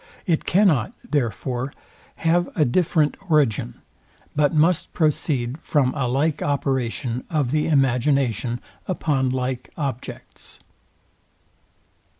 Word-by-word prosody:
It 165 -3 +1
cannot, 175 - +3
therefore, 125 0 -1 0.4
have 170 +2 +1
a 155 - +3
different 155 +2 +2
origin, 135 - +1 0.5
but 145 -1 +3
must 165 +3 +2
proceed 145 -4 0
from 135 -5 +1
a 135 -3 -1
like 145 +5 0
operation 130 -3 -1
of 145 -6 0
the 150 0 +1
imagination 130 -4 +1 0.3
upon 145 -7 0
like 130 0 -2
objects. 135 -5 -6
140 Hz, 100 wpm, -23 LUFS, 125-155 Hz, 0.5 s, cannot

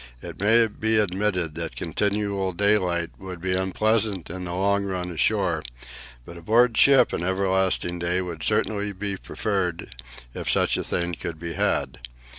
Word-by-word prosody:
It - - -9
may 115 +3 +5
be 110 0 0
admitted 95 -4 0
that 80 0 -5
continual 100 +2 -1
daylight 90 -3 +1
would 95 -2 -8
be 90 +2 -1
unpleasant 100 0 0
in 90 0 -6
the 85 0 -4
long 100 +2 +1
run 90 -2 -3
ashore, 80 -6 +1 0.6
but 85 - -10
aboard 115 +7 +3
ship 135 -1 +5
an - - -2
everlasting 95 -1 0
day 85 +1 0
would 85 -4 -5
certainly 105 0 0
be 100 +1 -3
preferred, 95 - -3 0.4
if - - -4
such - - +2
a - - -2
thing 85 0 -1
could 80 -1 -6
be 85 0 -5
had. - - -1
95 Hz, 155 wpm, -24 LUFS, 85-105 Hz, 0.6 s, may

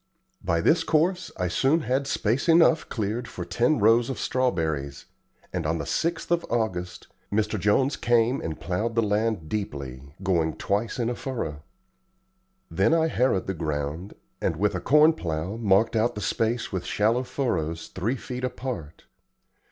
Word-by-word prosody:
By 85 0 +1
this 165 - +3
course 175 +3 +1
I 90 - 0
soon 135 - +2
had 135 0 0
space 130 - 0
enough 165 -1 +5
cleared 110 +2 -2
for 90 - -6
ten 120 - +2
rows 115 +3 +4
of 135 - -3
strawberries; 80 - -1 0.5
and 90 -2 -1
on 80 +1 0
the - - -4
6th 170 0 -1
of 170 0 +2
August 95 -7 -2 0.3
Mr. 105 0 0
Jones 130 +8 +2
came 120 +2 +2
and 80 -1 -5
plowed 105 +8 -2
the 115 - +3
land 105 -4 0
deeply, 70 -11 -4 0.2
going 85 -5 +1
twice 105 +3 -1
in 120 -2 0
a 120 - 0
furrow. 80 - -4 1.1
Then 95 - +3
I 160 0 +2
harrowed 125 -9 +1
the 95 - -2
ground, 75 +3 -4 0.3
and, - - 0
with 100 +5 +1
a 90 - -3
corn 150 +3 +5
plow, 85 - -3
marked 110 0 +3
out 115 +2 +1
the 105 - -5
space 115 +3 -1
with 95 -3 -2
shallow 110 +4 +1
furrows 85 - -2
three 110 +8 -2
feet 125 0 -6
apart. 125 - -5
110 Hz, 160 wpm, -26 LUFS, 90-130 Hz, 1.1 s, enough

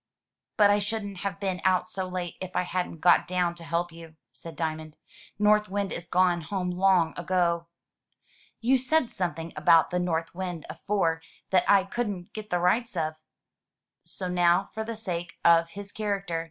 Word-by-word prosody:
"But 205 -1 +6
I 205 - +3
shouldn't 205 -1 -4
have 195 +1 -4
been 190 -2 -2
out 185 -1 +2
so 190 0 -4
late 180 -2 -4
if 185 -1 -6
I - - +2
hadn't 180 -3 -3
got 175 -1 +5
down 180 -1 0
to 170 -1 -11
help 170 +1 -1
you/* 165 -1 -12 0.2
said 165 -1 -10
Diamond. 155 -1 -4 0.4
"North 210 0 +3
Wind 200 0 -2
is 175 +1 -6
gone 175 0 +2
home 180 +2 -3
long 180 -2 +3
ago.'* 170 -1 0 0.9
"You 255 +3 +3
said 260 0 +1
something 165 -3 -3
about 160 +2 +4
the 180 - 0
north 165 -2 -1
wind 180 -3 -5
afore 165 -1 -1 0.3
that 185 - +3
I 200 -1 +6
couldn't 195 -3 -4
get 215 -1 -7
the 180 - +1
rights 190 +5 +1
of." 160 -1 0 0.9
So 185 - -5
now, 180 +1 +2
for 220 - -3
the 225 0 -5
sake 175 -5 -4
of 165 0 +5
his 200 +3 -9
character. 200 -5 -2
180 Hz, 175 wpm, -27 LUFS, 170-200 Hz, 0.9 s, But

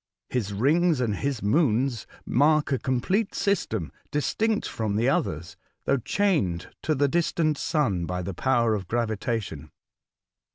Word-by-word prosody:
His 110 -6 -1
rings 150 - +2
and 110 -5 0
his 135 -6 -2
moons 125 -1 +1 0.2
mark 150 +2 +3
a 135 - +1
complete 185 - 0
system, 110 - -1 0.2
distinct 215 +9 0
from 110 -2 -2
the 115 +4 +2
others, 110 - -1 0.3
though 140 - +3
chained 130 - 0
to 155 - 0
the 145 +1 +3
distant 155 -1 +1
sun 100 - 0
by 90 +2 -3
the 95 - -4
power 120 +1 +2
of 95 -4 -3
gravitation. 110 - -2
125 Hz, 135 wpm, -26 LUFS, 105-155 Hz, 0.3 s, mark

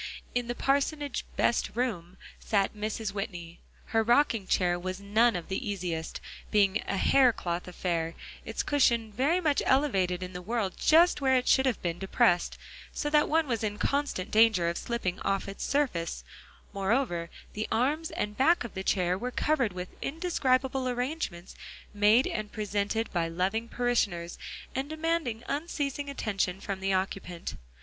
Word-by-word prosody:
In 245 -1 -1
the 240 - -3
parsonage 285 +1 0
"best 235 - +2
room" 195 -8 -2 0.2
sat 200 -2 +1
Mrs. 215 0 -3
Whitney. 175 -5 -6 0.3
Her 225 - +1
rocking 235 -3 +3
chair 175 -2 +2
was 185 +1 -4
none 215 +3 +3
of 175 - -4
the 195 +2 -3
easiest, 175 -5 -3 0.3
being 205 -1 +3
a 195 - -1
hair 260 +4 +5
cloth 175 -5 -4
affair, 170 -2 -2 0.3
its - - -3
cushion 235 -6 +2
very 280 - +2
much 305 -5 +2
elevated 190 -10 +2
in 185 0 -7
the 180 - -6
world 210 -1 -1
just 330 0 +5
where 265 -1 +4
it 250 -1 +1
should 265 0 +4
have 250 - 0
been 170 -1 -2
depressed, 180 -2 +2 0.3
so 295 - -3
that 300 0 +4
one 320 +1 +3
was 230 -5 -2
in 210 -1 -2
constant 280 -10 -1
danger 215 -6 +5
of 170 - -3
slipping 215 -7 -2
off 195 0 -1
its 195 - -6
surface; 260 -13 -1 0.5
moreover, 195 -4 0 0.2
the 215 +1 -3
arms 290 +8 +1
and 210 0 -3
back 320 +7 +4
of 235 - -7
the 190 - -4
chair 180 -1 +1
were 250 - -2
covered 260 -3 +1
with 180 0 -6
indescribable 265 -5 0
arrangements 245 - -3 0.4
made 210 +5 +5
and 215 -1 -3
presented 210 +1 -1
by 170 -2 +1
loving 190 +7 -1
parishioners 205 -9 -1 0.3
and 270 +2 -3
demanding 315 -7 -1
unceasing 285 -2 -2
attention 195 -8 -1
from 195 -1 -4
the 195 0 -1
occupant. 185 -2 -2
220 Hz, 160 wpm, -29 LUFS, 185-265 Hz, 0.5 s, hair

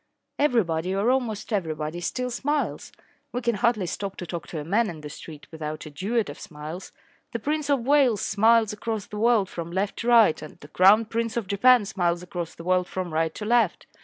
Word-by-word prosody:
Everybody 185 - +1
or 205 +5 +2
almost 240 -4 -2
everybody 160 -3 -2
still 250 +7 -2
smiles. 290 +5 -2 0.4
We 245 - -3
can 235 - +2
hardly 215 -1 +1
stop 195 +3 -4
to 180 - -6
talk 170 0 -6
to 160 - -5
a - - -5
man 210 +8 +1
in 160 -3 -8
the 150 -1 -8
street 155 0 -10
without 155 -1 -6
a 155 - -9
duet 210 +7 -1
of - - -8
smiles. 155 +3 -8 0.4
The - - 0
Prince 295 +4 -2
of 270 -5 +1
Wales 265 -7 +4
smiles 220 +1 +3
across 215 -1 -4
the 210 - -7
world 225 -3 +3
from 170 -2 -6
left 195 +3 -2
to 230 - -4
right, 230 -8 +5
and 155 - -11
the 145 - -13
Crown 200 +7 +5
Prince 230 +2 -2
of 230 - -1
Japan 215 +4 +4
smiles 175 -4 -1
across 175 -2 -6
the 165 - -10
world 180 0 +1
from 185 -3 -4
right 160 0 0
to 210 - -5
left. 230 -4 +2
200 Hz, 210 wpm, -25 LUFS, 170-235 Hz, 0.4 s, right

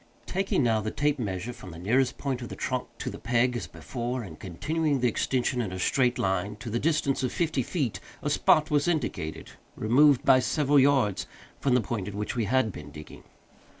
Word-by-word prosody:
Taking, 190 -6 0
now, 110 -2 +2
the 110 - -2
tape 145 +4 0
measure 105 +1 -3
from 95 - -11
the 80 - -9
nearest 120 +9 +1
point 135 -3 -3
of 120 - -6
the - - -6
trunk - - -2
to - - -4
the - - -8
peg, 125 +2 +1
as 120 - -4
before, 120 0 -4
and 100 - -10
continuing 145 - -1
the 125 - +2
extension 125 +2 0
in 105 -6 -3
a 95 - -5
straight 125 +6 +2
line 95 +2 -1
to 115 +1 -7
the 120 - 0
distance 155 -3 +1
of 130 - -1
fifty 160 -5 0
feet, 130 - -2 0.2
a - - 0
spot 155 0 +3
was 145 +1 +2
indicated, 140 - -2 0.2
removed, 135 +5 +4
by 130 -1 +7
several 145 +2 +3
yards, 135 -8 +3 0.3
from 135 -3 +2
the 125 - +4
point 115 -6 -3
at 100 - -6
which 105 +4 -3
we 115 -3 0
had 125 0 +2
been 75 - -9
digging. 75 +1 -11
125 Hz, 210 wpm, -27 LUFS, 105-140 Hz, 0.3 s, by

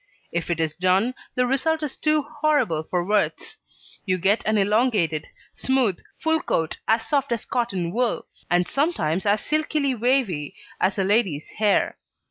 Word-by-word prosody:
If 170 +1 -3
it 170 -1 -1
is 160 -1 -1
done, 185 +7 +2 0.2
the 250 - +2
result 310 +5 +1
is 295 - -3
too 305 -1 +1
horrible 290 - +1
for 175 +2 -2
words: 210 +1 -1 0.4
you 185 -2 0
get 195 +5 +2
an 215 0 +2
elongated, 205 -6 +1 0.3
smooth, 255 -8 +1 0.2
full 320 0 +1
coat 160 -1 -1
as 225 0 +2
soft 280 0 0
as 235 -2 -1
cotton 195 -9 -2
wool, 245 0 0 0.2
and 175 0 +2
sometimes 205 - 0
as 205 +1 +3
silkily 305 -2 +1
wavy 230 - 0 0.2
as 190 +2 +1
a 195 - +2
lady's 190 -7 +1
hair. 210 -2 +1
215 Hz, 155 wpm, -24 LUFS, 180-265 Hz, 0.4 s, as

